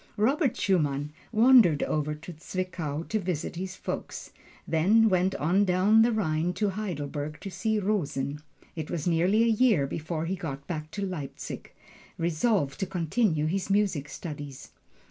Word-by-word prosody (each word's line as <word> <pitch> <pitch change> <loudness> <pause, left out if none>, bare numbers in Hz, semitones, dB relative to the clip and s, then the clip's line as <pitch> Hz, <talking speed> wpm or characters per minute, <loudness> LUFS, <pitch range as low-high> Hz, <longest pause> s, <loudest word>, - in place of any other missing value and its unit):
Robert 260 +4 +2
Schumann 150 -6 +1 0.2
wandered 225 - +6
over 150 0 -1
to 160 +4 -9
Zwickau 165 -2 -4
to 215 - 0
visit 180 -2 -3
his 185 +1 -5
folks, - - -6 0.4
then 210 +8 +4
went 185 0 +2
on 180 +7 +2
down 195 +4 +4
the 235 +2 +4
Rhine 175 -5 0
to 210 +1 0
Heidelberg 150 -7 -4
to 195 - -6
see 220 +4 0
Rosen. 150 -9 -1 0.3
It 160 -2 -5
was 155 -4 -3
nearly 180 +6 +3
a - - +3
year 225 - +3
before 160 +3 -3
he 185 +3 -1
got 140 -6 -6
back 155 -1 -5
to 200 -1 -2
Leipzig, 160 -8 -6 0.5
resolved 170 - 0
to 190 - -1
continue 170 -2 0
his 185 +4 -1
music 195 -8 +1
studies. 145 -3 -8
180 Hz, 150 wpm, -28 LUFS, 150-205 Hz, 0.5 s, wandered